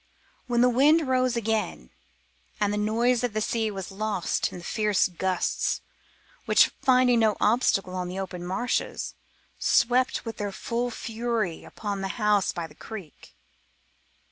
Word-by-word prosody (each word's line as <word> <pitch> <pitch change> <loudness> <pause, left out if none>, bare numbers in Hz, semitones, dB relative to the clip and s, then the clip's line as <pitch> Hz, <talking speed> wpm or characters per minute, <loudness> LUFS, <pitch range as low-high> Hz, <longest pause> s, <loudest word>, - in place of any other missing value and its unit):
Then 240 -1 +3
the 250 - +6
wind 290 +5 +4
rose 255 -1 +2
again, 215 - -2 0.7
and 205 -1 +1
the - - -1
noise 230 +4 +2
of 245 -3 -1
the 215 - 0
sea 220 0 0
was 195 -2 -6
lost 205 -2 -1
in - - -8
the 175 - -10
fierce 210 +1 +1
gusts 185 0 -1 0.6
which, - - +5
finding 255 -3 +4
no 220 -2 +3
obstacle 205 -4 +2
on 180 -1 -3
the 180 +1 -6
open 185 -2 -5
marshes, 210 +8 -2 0.5
swept 250 +1 +2
with 225 - -5
their 205 -1 -3
full 235 +5 -2
fury 225 -6 -3
upon 205 -2 -5
the 195 - -2
house 210 -3 +2
by 170 - -4
the 155 - -13
creek. 185 - -10
215 Hz, 150 wpm, -26 LUFS, 195-240 Hz, 0.7 s, the